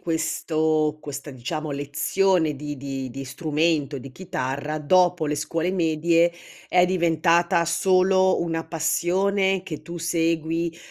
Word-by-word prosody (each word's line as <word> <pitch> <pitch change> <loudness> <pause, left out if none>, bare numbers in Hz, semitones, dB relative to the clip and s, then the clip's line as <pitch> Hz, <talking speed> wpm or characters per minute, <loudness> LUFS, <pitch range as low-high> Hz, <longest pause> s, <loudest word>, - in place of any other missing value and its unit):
questo 155 -1 0
questa 145 0 -7
diciamo 150 +4 -5
lezione 150 +3 +1
di 145 +1 -6
di 135 -1 -5
di 135 +2 -7
strumento, 150 0 -1
di 135 +1 -10
chitarra 150 -3 -4
dopo 180 +1 +3
le 150 0 -1
scuole 165 +4 -1
medie 170 -1 +2 0.4
è 180 0 +4
diventata 170 -1 +2
solo 185 +2 +3
una 165 -1 -2
passione 190 +4 +1
che 160 -5 -7
tu 170 0 -7
segui, 165 0 -1
165 Hz, 120 wpm, -24 LUFS, 150-175 Hz, 0.4 s, è